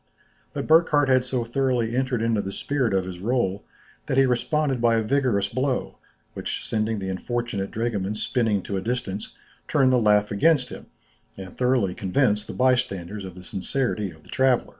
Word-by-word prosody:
But - - -3
Burckhardt 155 -3 +4
had 130 -1 +4
so 125 -1 -1
thoroughly 120 -2 0
entered 130 -3 0
into 115 -2 +1
the 95 - -5
spirit 130 +2 -1
of 95 -1 +1
his 90 -1 -7
rôle, 100 -2 0 0.5
that 130 - 0
he 135 - +6
responded 135 +1 0
by 115 -1 +4
a 110 - +1
vigorous 120 -5 +1
blow, 130 +4 -2 0.3
which - - -4
sending 110 0 -1
the 95 -1 -4
unfortunate 105 0 -3
dragoman 105 -3 -2
spinning 110 -4 0
to 100 - -3
a - - -2
distance, 110 -3 -4 0.3
turned 130 -3 +3
the - - +5
laugh 105 -2 +3
against 125 +4 +3
him, - - -10 0.5
and 95 -2 -9
thoroughly 125 -7 +1
convinced 105 +1 +1
the - - -6
bystanders 105 -7 0
of 95 -2 -8
the 90 - -11
sincerity 105 +2 -2
of 80 -2 -15
the - - -20
traveller. 130 -2 +2
115 Hz, 180 wpm, -24 LUFS, 100-130 Hz, 0.5 s, he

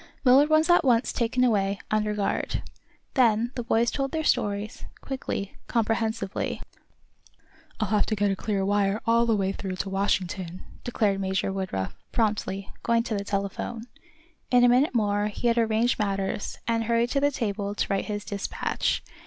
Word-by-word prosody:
Millard 270 +4 +6
was 310 0 +4
at 350 -1 +5
once 245 -3 +3
taken 250 +1 +1
away, 200 -4 +2
under 215 0 +1
guard. 205 -1 -1 0.5
Then 235 -2 +3
the 245 - -3
boys 235 0 +2
told 275 -1 -1
their 320 -1 -1
stories, 205 -5 -1
quickly, 260 -7 -4
comprehensively. 225 -3 -1 1.2
"I'll 215 - 0
have 210 -1 +2
to 215 - 0
get 205 -1 +1
a - - 0
clear 195 -1 -1
wire 200 +1 +1
all 235 0 +3
the 225 - +3
way 195 -2 0
through 190 -1 -5
to 195 +1 -4
Washington," 185 -2 -1 0.2
declared 210 -5 0
Major 190 0 -1
Woodruff, 185 - -3 0.2
promptly, 205 -3 -1
going 230 0 +2
to 225 - -2
the 200 - -2
telephone. 200 +3 -3 0.7
In 245 -1 +5
a 245 - +7
minute 255 +3 +3
more 205 -2 +2
he 215 +3 -2
had 235 0 +2
arranged 225 +2 +2
matters, 195 -1 -2
and 230 -1 +1
hurried 235 +1 +1
to 280 - +2
the 285 +1 +3
table 205 -6 -3
to - - 0
write 195 -1 0
his 205 -1 -4
despatch. 200 -2 -2
215 Hz, 170 wpm, -26 LUFS, 200-235 Hz, 1.2 s, a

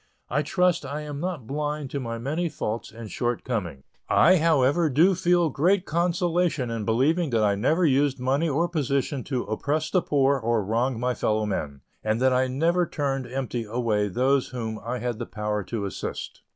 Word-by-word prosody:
I 140 +4 +2
trust 180 +2 +1
I 140 +2 -4
am 145 -1 -6
not 170 -7 -4
blind 150 +1 -3
to 140 - -2
my 115 -3 -4
many 155 +8 -2
faults 115 -5 -4
and 115 -1 -9
shortcomings. 115 - -2 0.3
I, 185 +1 +6
however, 155 0 +3
do 165 +8 +4
feel 175 -3 +2
great 180 +8 +2
consolation 170 -5 0
in 115 -2 -3
believing 150 - +2
that 115 -3 +1
I 105 -1 +3
never 155 - +2
used 140 -1 +2
money 135 +6 +1
or 160 +5 +1
position 140 -4 -1
to 130 -4 -2
oppress 145 +8 -2
the 185 - +3
poor 140 -2 +2
or 115 -3 0
wrong 115 +3 0
my 125 +1 0
fellow 110 -1 0
men, 75 -9 -3 0.2
and 110 +1 0
that 130 0 +3
I 130 +1 +2
never 165 +7 +1
turned 135 -4 -2
empty 125 -2 -3
away 110 -2 0
those 130 +7 +1
whom 110 -3 -5
I 120 +3 -3
had 120 -1 -3
the 120 - -4
power 105 -1 -2
to 110 -4 -3
assist. 95 - -6
135 Hz, 185 wpm, -25 LUFS, 115-155 Hz, 0.3 s, I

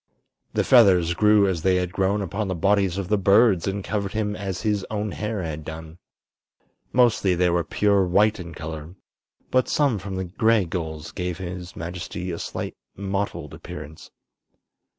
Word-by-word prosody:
The - - +1
feathers 95 -9 +5
grew 105 +2 +4
as 90 -4 -1
they 95 +2 +3
had 90 -1 -1
grown 100 +1 +1
upon 100 +3 -3
the 95 - -2
bodies 95 +1 +2
of 100 -2 -3
the 105 +1 +1
birds 100 -1 +4
and 100 0 -2
covered 100 -1 -2
him 105 -1 -1
as 95 -2 -4
his 105 -3 0
own 105 -1 -2
hair 105 0 -3
had 80 -1 -5
done. 80 +2 -9 0.9
Mostly 115 -7 +3
they 90 0 +2
were 85 0 +1
pure 100 +3 +2
white 105 +4 +3
in 85 -1 -8
color, 80 +2 -7 0.6
but 130 0 +2
some 140 -8 +2
from 95 0 -6
the 95 0 -2
gray 110 +3 +2
gulls 80 -3 -5
gave 90 -1 -3
his 90 -1 -7
majesty 90 +1 -5
a 85 - -5
slight - - -5 0.2
mottled 100 +1 -3
appearance. 75 +1 -9
95 Hz, 170 wpm, -24 LUFS, 85-105 Hz, 0.9 s, feathers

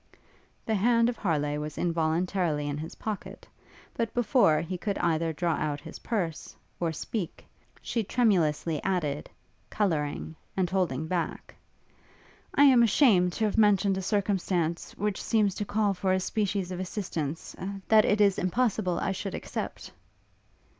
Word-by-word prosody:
The 220 - 0
hand 230 +3 +3
of 240 - -4
Harleigh 150 -5 0
was 150 0 -6
involuntarily 165 -1 0
in 145 0 -3
his 160 +2 -7
pocket, 215 -3 -6 0.5
but 230 -1 -2
before 235 - +4
he 170 +3 -4
could 200 +2 -2
either 165 -1 +1
draw 170 +1 0
out 150 -2 -2
his 160 +2 -10
purse, 180 -9 -3 0.2
or 170 -2 0
speak, 180 +3 -5 0.4
she 230 - -1
tremulously 170 - +1
added, 155 -7 -1 0.4
colouring, 160 -5 -1 0.2
and 185 -2 +2
holding 170 -6 0
back, 170 0 -3 1.0
'I 285 - +6
am 260 -4 +7
ashamed 205 -6 +4
to 220 - 0
have 215 +1 0
mentioned 200 -2 +4
a 190 - -2
circumstance, 185 -4 -1
which 205 0 -1
seems 210 -3 +2
to 205 - -3
call 205 0 +1
for 185 0 0
a 185 - +2
species 195 -1 -1
of 180 - -4
assistance, 175 -5 -4 0.3
that 220 -1 +6
it 210 - +2
is 200 -2 +4
impossible 195 -2 0
I - - -1
should 195 +1 -4
accept.' - - -5
185 Hz, 145 wpm, -28 LUFS, 160-210 Hz, 1.0 s, am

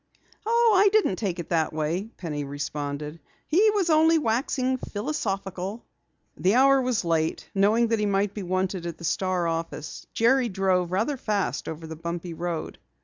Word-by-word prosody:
"Oh, 465 -1 +4
I 410 - +6
didn't 395 - +2
take 190 -5 -2
it 170 - -6
that 160 -2 +1
way," 160 +7 -2
Penny 150 -5 -4
responded. 145 +2 -5 0.3
"He 395 +8 +4
was 400 -5 +1
only 320 +1 +5
waxing 255 0 0
philosophical." 205 -5 -4 0.5
The 190 +4 +2
hour 270 +1 +5
was 250 -6 0
late. 160 -1 0
Knowing 215 +4 +3
that 225 -1 +1
he 210 - +1
might 200 0 +1
be 210 - -5
wanted 185 -1 -2
at 165 -2 -6
the 170 - -12
Star 180 +1 0
office, 165 -2 -4
Jerry 240 +2 +3
drove 185 -2 +1
rather 220 +10 0
fast 210 -5 -2
over 160 +1 -7
the 160 0 -7
bumpy 170 +1 -5
road. 170 -1 -4
195 Hz, 165 wpm, -26 LUFS, 170-240 Hz, 0.5 s, I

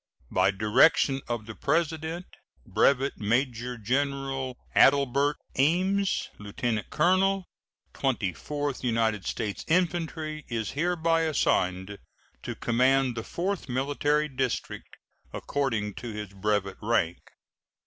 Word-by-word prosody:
By 95 +1 +3
direction 115 +7 +3
of 120 -2 -3
the 110 - -7
President, 160 +5 -1 0.4
Brevet 140 0 +2
Major 120 +2 0
General 135 +2 -1 0.2
Adelbert 140 +1 +4 0.2
Ames, 185 +7 +2
lieutenant 105 +1 -3
colonel 190 +1 +2 0.5
Twenty 115 -9 -1
fourth 145 - -4
United 115 -5 0
States 105 -3 -3
Infantry, 160 -3 0
is 115 -3 -2
hereby 165 +1 +1
assigned 100 - 0 0.4
to - - -5
command 130 +1 +2
the 115 - -4
Fourth 185 - -3
Military 145 +4 +1
District, 130 -3 -4 0.4
according 115 -8 -1
to 120 +3 -7
his 105 -2 -6
brevet 100 0 -1
rank. 100 -6 +1
135 Hz, 105 wpm, -27 LUFS, 110-155 Hz, 0.5 s, Adelbert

